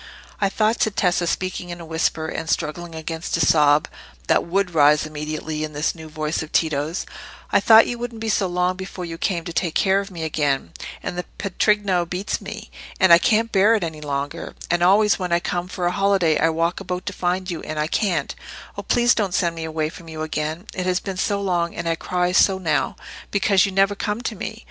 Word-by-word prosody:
"I 195 - +2
thought," 215 +3 +1
said 215 -2 +1
Tessa, 180 -2 +1
speaking 185 0 -2
in 175 0 -6
a 170 - -8
whisper, 160 0 -1
and 160 0 -5
struggling 165 +2 -2
against 160 +1 -3
a - - -3
sob 150 0 +4 0.4
that - - +3
would 185 +1 -1
rise 150 -1 +5
immediately 155 0 -4
at 155 0 -5
this 150 +2 0
new 160 -2 -11
voice 155 0 -2
of 160 - -7
Tito's—"I 155 +2 -1
thought 225 -1 +7
you 240 - -4
wouldn't 240 -1 -5
be 225 - -4
so 210 -3 +1
long 180 +1 0
before 190 -1 -6
you 165 -1 -7
came 175 -4 -1
to 170 - -5
take 170 -2 -1
care 195 0 +3
of 200 0 -5
me 170 -4 -6
again. 145 - -1 0.3
And 180 - -4
the 180 - -4
patrigno 195 -2 +1
beats 185 +5 -3
me, 215 +2 -8 0.3
and 190 -2 +6
I 170 - +9
can't 225 +4 +2
bear 205 +3 +5
it 210 - -1
any 160 -2 -5
longer. 145 -1 -4 0.2
And 175 0 +1
always 200 +4 +4
when 180 -2 -3
I 170 - +3
come 175 0 -3
for 180 -1 -4
a 175 - +2
holiday 195 -4 +2
I 165 - +3
walk 165 +2 0
about 180 0 -4
to 200 - -3
find 180 +1 -1
you, 165 - -4
and 155 - -6
I 150 - +1
can't. 190 +3 0 0.4
Oh, - - -4
please 240 -1 +3
don't 195 -5 -1
send 170 -2 +1
me 165 -1 -5
away 155 -1 -2
from 165 0 -12
you 155 0 -5
again! 155 +3 -3
It 185 0 -3
has 180 0 +2
been 195 -2 -6
so 200 +1 0
long, 175 -3 -1
and 170 - -4
I 165 - +2
cry 180 +2 -1
so 190 +1 +4
now, 175 -4 0 0.3
because 200 -1 +3
you - - -4
never 195 +1 +3
come 210 +2 -3
to 240 -3 -3
me. 220 +3 -6
175 Hz, 225 wpm, -22 LUFS, 160-195 Hz, 0.4 s, I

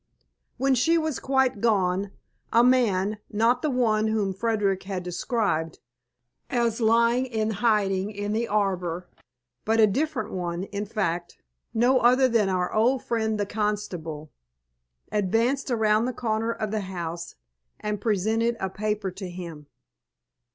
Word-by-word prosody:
When 270 +2 +2
she 325 +7 +3
was 315 -5 -1
quite 265 -5 +1
gone, 195 -3 +1 0.4
a 235 - +5
man 215 -5 +2
not 230 +4 +2
the 305 - 0
one 220 -4 +2
whom 210 -3 0
Frederick 200 -2 0
had 190 -2 -4
described, 180 -3 -1 0.7
as 235 -1 0
lying 235 +3 +3
in 220 -3 -1
hiding 200 -3 +1
in 205 0 -3
the 230 +2 0
arbour, 180 -4 -1 0.6
but 225 +1 +1
a 220 - +8
different 220 0 -1
one, 175 -1 -3
in 200 +1 -5
fact, 175 -5 -2 0.3
no 245 +3 +3
other 255 +2 +5
than 225 -5 +2
our 180 -1 -1
old 245 +4 +2
friend 220 -2 -1
the 205 - +1
constable 195 -8 -3 0.8
advanced 230 +8 +1
around 220 -2 +2
the 255 - -2
corner 225 -1 -1
of 215 -2 -3
the 215 -1 -1
house 170 -3 -5 0.4
and 210 -1 -3
presented 225 +3 +1
a 190 -1 -2
paper 210 -1 -2
to 190 0 -7
him. 170 -5 -8
215 Hz, 140 wpm, -26 LUFS, 190-235 Hz, 0.8 s, a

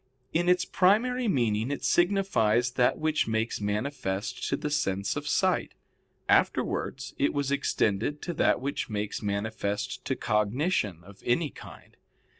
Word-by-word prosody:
In 175 +2 +2
its 180 0 +3
primary 235 +6 +2
meaning 115 - +1
it 145 - -4
signifies 125 - +2
that 125 -1 +2
which 155 0 0
makes 110 0 -1
manifest 105 -3 -2
to - - 0
the 150 - -3
sense 100 -8 0
of - - -4
sight; - - +1 0.5
afterwards 130 -1 +1
it 140 - +1
was 140 -1 0
extended 140 -1 0
to 175 - -3
that - - +2
which 140 +1 -3
makes 105 -1 -3
manifest 100 0 -2
to - - 0
cognition 105 - 0
of 100 +2 -15
any 140 +4 +1
kind. - - -13
125 Hz, 140 wpm, -28 LUFS, 105-155 Hz, 0.5 s, its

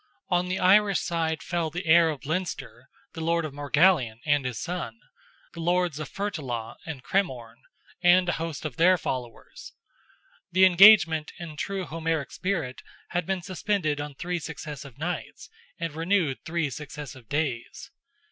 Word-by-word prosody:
On 180 0 +1
the 185 +1 -1
Irish 200 +1 +4
side 160 -2 -2
fell 170 -2 -1
the 175 +4 -5
heir 165 0 +6
of 150 -2 -5
Leinster, 145 -6 -4 0.2
the 165 - -6
lord 170 0 +1
of 150 - -6
Morgallion 145 -4 +2
and 145 -3 +2
his 125 -3 -3
son; 160 -10 -5 0.5
the 170 - -9
lords 175 -2 +1
of 155 - -5
Fertullagh 140 - -4
and 145 -6 -6
Cremorne, 125 -11 -2 0.4
and 180 +1 +5
a - - +2
host 165 -3 -4
of 145 -6 -5
their 180 +2 +5
followers. 125 -7 -6 0.8
The 185 +2 +6
engagement, 175 -4 +7
in 165 -3 -8
true 195 +4 -3
Homeric 165 -3 -2
spirit, 165 -10 -3 0.3
had 175 -2 -2
been 190 -2 -1
suspended 185 -5 -1
on 145 -1 -7
three 175 +4 -3
successive 145 -5 -8
nights, 175 - -5 0.3
and 165 -2 -3
renewed 165 -3 +1
three 160 -3 -1
successive 140 -3 -8
days. 140 -5 -3
160 Hz, 150 wpm, -26 LUFS, 145-180 Hz, 0.8 s, engagement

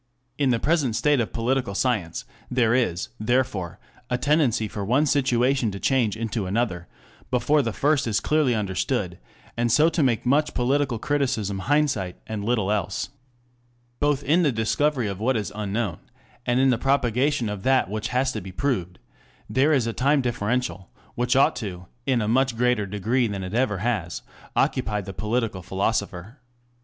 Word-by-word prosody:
In 140 -2 +3
the 120 - +3
present 145 -7 +1
state 145 +4 +2
of 115 - -1
political 120 -3 -1
science 105 -9 -1 0.2
there 120 -3 +2
is, 105 -9 0
therefore, 110 -6 0 0.3
a 125 - +1
tendency 130 -5 +2
for 105 0 -5
one 130 +9 +2
situation 130 -3 +2
to 100 -1 -6
change 120 -5 +1
into 110 -3 -2
another, 95 -4 -1 0.4
before 135 +4 +2
the 115 -4 -2
first 140 +2 +1
is 105 -2 +1
clearly 150 -6 +2
understood, 100 -4 -2 0.4
and 120 0 0
so 150 +7 +5
to 165 0 -1
make 125 -5 +1
much 145 +4 +2
political 130 0 +1
criticism 125 -7 -1
hindsight 110 -6 0
and 110 -2 -4
little 110 -3 +1
else. 100 -3 -2 0.9
Both 145 -1 +1
in 160 +6 +3
the 150 -5 +3
discovery 115 +4 0
of 100 -1 -4
what 125 +3 +1
is 100 -1 -4
unknown, 105 -4 -2 0.5
and 120 +1 +2
in 135 0 +4
the 120 - 0
propagation 135 0 +1
of 105 -2 -4
that 130 +4 +3
which 105 +2 -3
has 130 +2 0
been 95 -4 -6
proved, 95 -8 -2 0.5
there 130 +8 +2
is 135 -6 +3
a 115 - -2
time 140 +4 +2
differential, 120 -6 -2 0.2
which 120 +1 0
ought 135 - +4
to, 90 -6 -6 0.2
in 125 -4 +2
a - - -2
much 125 +1 +2
greater 125 -4 +1
degree 110 +5 0
than 100 -2 -4
it 90 +2 -6
ever 115 -4 +1
has, 95 -4 -2 0.3
occupy 105 -1 +1
the 95 0 -8
political 110 -1 -2
philosopher. 100 - -2
120 Hz, 170 wpm, -24 LUFS, 105-135 Hz, 0.9 s, so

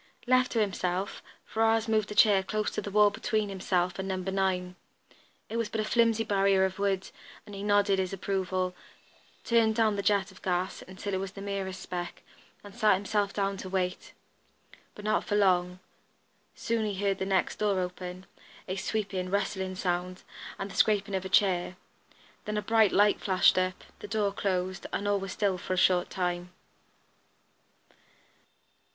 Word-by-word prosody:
Left 255 0 +3
to 230 - +1
himself, 190 -2 -1 0.2
Ferrars 225 0 +1
moved 215 -2 +1
a - - -5
chair 205 -3 +6
close 210 +2 -2
to - - -3
the - - -5
wall 205 0 +5
between 215 0 -1
himself 185 -1 -1
and 190 - -3
number 190 0 -2
nine. 185 -2 -1 0.7
It 225 - -4
was 230 -2 -1
but 225 - -3
a - - +1
flimsy 230 0 +3
barrier 195 -2 +3
of 190 +1 -4
wood 195 -1 -1 0.3
and 205 - -11
he 195 - -6
nodded 205 -1 +3
his 185 -1 -1
approval, 185 -1 -2 0.7
turned 225 -2 +3
down 215 -2 +2
the - - 0
jet 200 0 +1
of 190 - -17
gas, 180 0 -1
until 190 +2 -6
it 190 - 0
was 195 0 -5
the 195 - -9
merest 195 -2 -4
speck, 175 -1 -6 0.4
and 205 -1 -11
sat 215 -3 +4
himself 205 +1 -1
down 195 -1 -1
to 185 - -7
wait. 185 -1 -2 0.8
But 210 - -10
not 215 - +1
for 205 - -2
long; 180 -3 +2 0.8
soon 230 -1 -1
he 210 -2 -2
heard 195 0 0
the 190 - -1
next 190 -1 +1
door 205 -3 +1
open, 180 0 -5 0.4
a 185 +1 -3
sweeping, 195 -2 -2
rustling 190 -1 -1
sound, 180 0 -2 0.3
and 195 0 -5
the - - -10
scraping 205 -2 +2
of 190 0 -1
a - - -4
chair. 185 -2 +2 0.7
Then 210 0 -2
a 210 - -1
bright 220 -1 +4
light 205 +1 +3
flashed 185 -1 +4
up, 185 0 -2 0.2
the - - -8
door 205 -1 0
closed, 185 -2 -2
and 205 - -2
all 205 -1 +2
was 195 -1 -5
still 195 -3 0
for 185 - -3
a - - -1
short 180 0 +3
time. 180 -1 -2
195 Hz, 175 wpm, -29 LUFS, 185-210 Hz, 0.8 s, chair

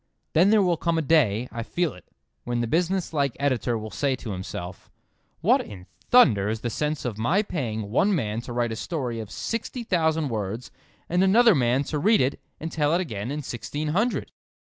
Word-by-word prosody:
Then 175 +5 +5
there 215 -1 +5
will 175 -2 +2
come 170 0 0
a 160 - +1
day—I 125 -6 +2
feel 170 +6 -1
it—when 85 - -8
the - - 0
business 175 +7 0
like 140 -4 0
Editor 130 -4 0
will 110 0 -7
say 140 -2 0
to 120 -3 -7
himself: 90 -1 -7 0.5
"What - - +4
in 95 -3 -11 0.2
thunder 110 - +5
is 110 0 -3
the 120 - -2
sense 150 +2 -2
of 110 -4 -3
my 175 - +2
paying 110 - -4
one 195 - +3
man 110 -7 -2
to 120 - -9
write 120 -1 0
a - - -3
story 125 -3 -3
of 110 -3 -6
sixty 230 - -4
thousand 160 -6 +1
words 110 +1 -4 0.4
and 180 +2 +2
another 225 +4 +6
man 130 -2 +2
to 150 +1 -3
read 215 +8 +4
it 130 +2 0 0.2
and 160 +1 -5
tell 150 0 +1
it - - +2
again 110 - -4
in 150 +1 -3
sixteen 145 +5 -4
hundred!" 215 +10 0
140 Hz, 195 wpm, -25 LUFS, 115-170 Hz, 0.5 s, another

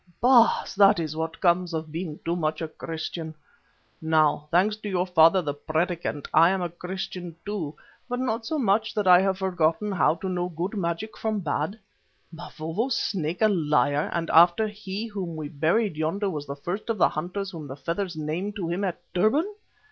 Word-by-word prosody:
Oh! 245 -2 +6
Baas, - - -8
that 200 -1 +5
is 155 -2 -3
what 160 0 -4
comes 175 -1 +2
of 160 -1 -4
being 160 -1 -5
too 170 +1 0
much 155 -3 -1
a 160 - -3
Christian. 160 0 -6 0.7
Now, 155 -2 +2
thanks 190 +6 +3
to 215 -1 -6
your 180 -2 0
father 180 0 +5
the 145 -2 -2
Predikant, 160 0 -2
I 165 +2 +7
am 190 -1 0
a 175 - -2
Christian 180 0 -6
too, 185 -8 -4 0.3
but 245 - -1
not 230 -3 -1
so 310 +7 -2
much 220 -4 +1
that 210 -2 0
I 180 0 +8
have 190 -1 +1
forgotten 190 +2 0
how 180 -4 +3
to 180 +3 -6
know 180 -1 -1
good 180 +5 -4
magic 175 +3 -3
from 215 -2 -2
bad. 155 +5 -2 0.6
Mavovo's 170 +8 -3
Snake 175 +1 -1
a - - +7
liar, 150 -6 +1
and 170 -1 -2
after 175 +6 +6
he 210 0 -5
whom 195 -7 -5
we 155 -2 -5
buried 165 +6 +1
yonder 190 +6 -1
was 150 -3 -5
the 140 - -5
first 175 +10 -5
of 225 - 0
the - - +4
hunters 185 +5 -4
whom 160 -5 -8
the 135 - -7
feathers 170 +6 -3
named 160 +7 -3
to 190 -6 -3
him 180 +4 -2
at 185 -3 -2
Durban!" 280 - +2
175 Hz, 195 wpm, -26 LUFS, 160-200 Hz, 0.7 s, I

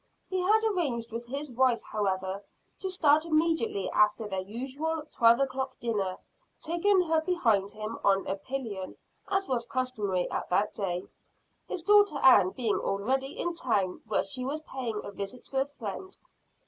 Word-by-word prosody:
He 375 - 0
had 430 +4 +3
arranged 285 - -1
with 235 +1 -5
his 280 +2 -4
wife, 245 -1 +2
however, 190 -1 -2 0.4
to 380 - -3
start 310 -4 +4
immediately 315 - +1
after 210 +1 +3
their 190 -2 -2
usual 270 +10 -4
twelve 230 +1 +5
o'clock 265 -1 -2
dinner, 200 -6 -2 0.4
taking 365 +4 +2
her 320 -2 +1
behind 230 - +1
him 215 +1 -5
on 195 -1 +3
a 190 - -1
pillion, 205 -3 -5 0.3
as 390 0 0
was 240 -2 -1
customary 210 -8 -1
at - - -3
that 200 +4 +1
day 180 -3 -2 0.6
his 345 - -4
daughter 410 -3 +5
Ann 205 -8 +6
being 225 +1 -1
already 265 +8 -1
in 345 - -1
town, 200 - 0
where 215 - +1
she 250 +6 -1
was 290 +4 -3
paying 245 -7 -4
a 205 - -7
visit 200 +5 -6
to 270 -1 0
a - - +1
friend. 285 - -7
250 Hz, 160 wpm, -29 LUFS, 205-310 Hz, 0.6 s, Ann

